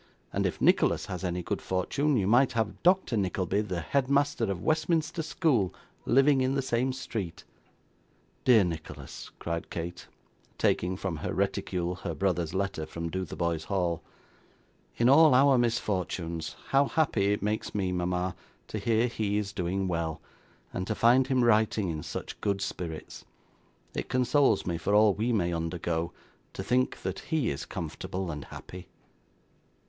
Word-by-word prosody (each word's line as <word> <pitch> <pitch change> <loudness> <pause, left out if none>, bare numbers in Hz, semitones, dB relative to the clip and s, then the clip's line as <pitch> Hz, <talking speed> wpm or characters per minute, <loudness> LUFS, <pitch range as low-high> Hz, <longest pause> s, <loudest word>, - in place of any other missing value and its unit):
and - - +1
if - - -4
Nicholas - - +3
has 90 -1 -5
any 90 -1 -2
good - - -3
fortune, 135 +10 0
you 100 - +1
might 120 +6 +4
have 110 -2 -1
Doctor 180 -8 +3
Nickleby, 95 0 0
the 95 -5 -3
head 130 - 0
master 140 -4 +2
of 100 -4 -3
Westminster 160 +1 +1
School, 145 - +1 0.3
living 135 +1 +5
in 130 +1 +1
the 135 - 0
same 130 +1 +1
street.' 110 -8 -5 1.0
'Dear 120 -5 +6
Nicholas!' 80 -3 -6
cried 85 0 -4
Kate, 85 +1 -6 0.5
taking 90 +1 +1
from 95 -4 -3
her - - -3
reticule 90 -1 -1
her 85 -4 -4
brother's 90 -3 0
letter 95 -5 -2
from 85 +1 -5
Dotheboys 85 -3 -2
Hall. 90 -5 0 1.0
'In 120 - +3
all 145 +1 +7
our 135 -1 +6
misfortunes, 90 -8 -1
how 140 +1 +4
happy 105 -11 +2
it 105 - -1
makes 105 +1 -2
me, 95 -3 0
mama, 90 0 -1 0.3
to 110 - -3
hear 115 +3 +2
he 110 -4 -1
is 100 -2 -2
doing 95 +1 -1
well, 85 -3 -2 0.5
and 95 +1 -3
to 110 - -1
find 125 +4 +4
him 130 -2 +2
writing 110 -3 +3
in 80 -2 -3
such - - -6
good 100 -1 0
spirits! 80 -5 -5 0.7
It - - -4
consoles 130 +3 +3
me 85 -2 -2
for 100 +5 +1
all 105 -1 +6
we 110 +5 -1
may 90 -6 +1
undergo, 85 0 -2 0.4
to 95 - -5
think 125 +4 0
that - - -3
he 160 -4 -1
is 70 - -5
comfortable 95 -2 -4
and 75 -2 -6
happy. 90 0 -10
100 Hz, 155 wpm, -29 LUFS, 85-125 Hz, 1.0 s, all